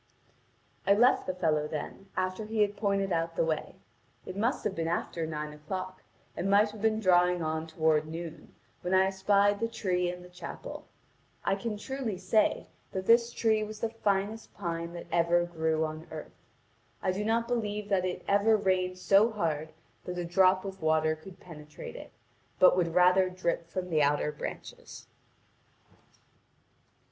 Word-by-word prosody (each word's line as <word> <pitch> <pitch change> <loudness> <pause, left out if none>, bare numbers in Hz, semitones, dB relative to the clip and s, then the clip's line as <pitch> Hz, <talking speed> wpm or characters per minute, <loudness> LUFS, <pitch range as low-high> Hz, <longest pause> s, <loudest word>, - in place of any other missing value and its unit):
I 200 - +6
left 245 +5 +4
the 185 - -2
fellow 155 -4 +1
then, 160 +6 -6
after 185 +3 -1
he 220 0 -1
had 205 0 -2
pointed 200 -2 0
our 165 0 0
the - - +2
way. 160 -1 -2 0.5
It 185 - -7
must 225 +5 0
have 210 - -1
been 165 -3 -2
after 165 -1 -2
nine 150 -1 -4
o'clock 185 +5 -6 0.3
and 195 - -2
might 205 +1 +4
have 215 -1 -11
been 220 0 +2
drawing 180 -3 +3
on 160 +1 -2
toward 160 -1 +1
noon, 165 0 -8 0.3
when 180 +1 0
I 190 0 +5
espied 200 +1 +2
the 230 - 0
tree 180 -6 -1
and 180 0 -7
the - - -13
chapel. 180 -1 -8 0.6
I - - +2
can 210 +2 -3
truly 245 -2 -4
say 190 +4 +2 0.3
that 190 0 -3
this 235 +1 +5
tree 220 -2 +2
was 215 0 -7
the 230 - -1
finest 210 0 -1
pine 170 -2 -4
that 170 - -7
ever 170 +1 +3
grew 160 -2 0
on 155 +1 -7
earth. - - -8 0.7
I 185 - +2
do 195 +3 -2
not 230 +2 +1
believe 210 -4 -2
that 195 -3 +2
it 185 -1 -3
ever 205 +2 +4
rained 185 -2 0
so 200 +4 +4
hard 160 -8 -2 0.4
that 180 0 -5
a 175 - -2
drop 185 +2 +3
of 195 -2 -7
water 155 0 +2
could 180 +4 -13
penetrate 150 -3 -10
it, - - -10 0.5
but 185 - +6
would 170 -2 0
rather 180 +1 +5
drip 175 -2 -2
from 180 0 -4
the 155 -2 +3
outer 145 +1 +2
branches. 150 - -8
185 Hz, 170 wpm, -30 LUFS, 165-205 Hz, 0.7 s, I